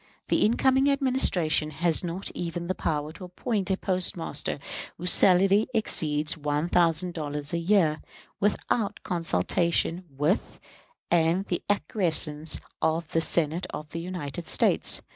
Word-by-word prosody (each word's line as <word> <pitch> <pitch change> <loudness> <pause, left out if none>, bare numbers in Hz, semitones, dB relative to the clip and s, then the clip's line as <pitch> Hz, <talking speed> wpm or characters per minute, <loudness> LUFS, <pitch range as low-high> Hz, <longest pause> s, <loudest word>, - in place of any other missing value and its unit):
The - - +2
incoming 265 +5 +3
Administration 255 - +2
has 160 +3 0
not 175 +2 -4
even 170 0 -4
the 185 - -1
power 150 -3 -2
to 185 - -12
appoint 195 +2 -3
a 190 - +1
postmaster 180 -3 -2 0.4
whose 180 +2 +2
salary 195 +3 +5
exceeds 155 -7 +2
one 150 +1 -2
thousand 175 +1 +2
dollars 150 -2 -4
a 170 - 0
year, 170 -4 +2 0.4
without 210 +1 -1
consultation 170 - 0
with 145 +8 -1 0.5
and 170 +3 +2
the 175 - -2
acquiescence 160 -5 0 0.2
of 160 0 0
the 165 - +1
Senate 165 +2 +1
of 150 0 -8
the 165 - -5
United 170 -3 -6
States. - - +2
170 Hz, 130 wpm, -26 LUFS, 155-190 Hz, 0.5 s, salary